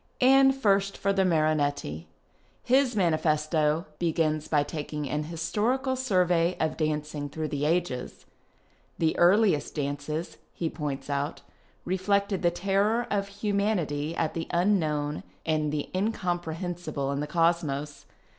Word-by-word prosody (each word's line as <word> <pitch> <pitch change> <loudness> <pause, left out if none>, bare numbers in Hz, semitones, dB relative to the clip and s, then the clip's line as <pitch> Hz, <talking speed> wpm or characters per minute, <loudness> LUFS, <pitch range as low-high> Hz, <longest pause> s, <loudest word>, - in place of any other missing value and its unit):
And 270 +1 +6
first 200 -5 +1
for 200 0 +1
the 195 -1 +2
Marinetti. 145 - 0 0.6
His 255 -1 +3
manifesto 155 -3 +1
begins 155 -2 0
by 145 -2 +2
taking 150 -1 -5
an 150 +2 -2
historical 215 - -1
survey 180 -8 +2
of 160 -1 0
dancing 150 -2 -2
through 155 +1 -4
the 145 0 -2
ages. 165 -6 -1 0.7
The 160 -1 +1
earliest 185 -3 +4
dances, 150 +3 -3 0.2
he 165 -2 -2
points 145 -3 -4
out, 145 +1 -2 0.4
reflected 200 +1 0
the 175 - +4
terror 200 +6 +1
of 200 -1 0
humanity 200 -7 -1
at 160 -2 -1
the 165 - -4
unknown 155 -5 +1 0.2
and 155 -2 0
the 150 -1 -2
incomprehensible 175 -6 -2
in 140 - -2
the 150 - -2
Cosmos. 150 -3 0
165 Hz, 125 wpm, -27 LUFS, 150-195 Hz, 0.7 s, And